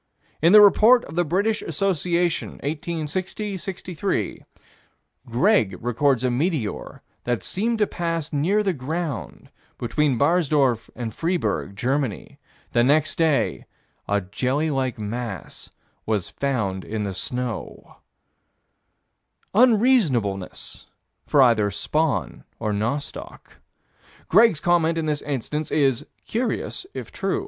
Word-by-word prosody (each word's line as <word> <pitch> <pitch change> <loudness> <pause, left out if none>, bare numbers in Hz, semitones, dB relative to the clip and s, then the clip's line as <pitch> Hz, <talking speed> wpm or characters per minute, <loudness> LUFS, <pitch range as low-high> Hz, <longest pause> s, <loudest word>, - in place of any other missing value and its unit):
In 165 +3 +5
the 210 +1 +10
Report 225 +5 +6
of - - -10
the 175 +2 +2
British 200 +7 0
Association, 175 0 0
1860 170 +7 -3
63, 185 - -3 0.8
Greg 120 - +2
records 125 +2 +1
a 125 - +1
meteor 140 - -2 0.2
that 120 -2 -1
seemed 225 +4 -1
to 210 - +3
pass 165 -4 -3
near 185 +9 +2
the 195 -3 +1
ground, 155 +2 -5 0.3
between 130 +3 0
Barsdorf 140 -6 +2
and 115 -3 -5
Freiburg, 160 - -1
Germany: 135 +3 -2 0.3
the 120 - +3
next 150 +4 +3
day 160 -4 +1 0.4
a 100 0 +1
jelly 130 +11 -1
like 130 -3 -1
mass 110 -3 -6 0.4
was 105 -5 -1
found 105 -9 -2
in 110 -1 -3
the 100 -2 -3
snow 125 +3 -5 1.6
Unseasonableness 200 - +2 0.4
for 140 - +5
either 110 -4 +3
spawn 155 +9 -1
or 110 -2 -2
nostoc. 120 +8 -5 0.7
Greg's 215 -3 +5
comment 165 0 +2
in 165 - -1
this 150 -1 -1
instance 145 +2 -3
is: 135 -5 +1 0.2
"Curious 245 +9 -2
if - - -6
true." 390 - -1
145 Hz, 115 wpm, -23 LUFS, 120-175 Hz, 1.6 s, the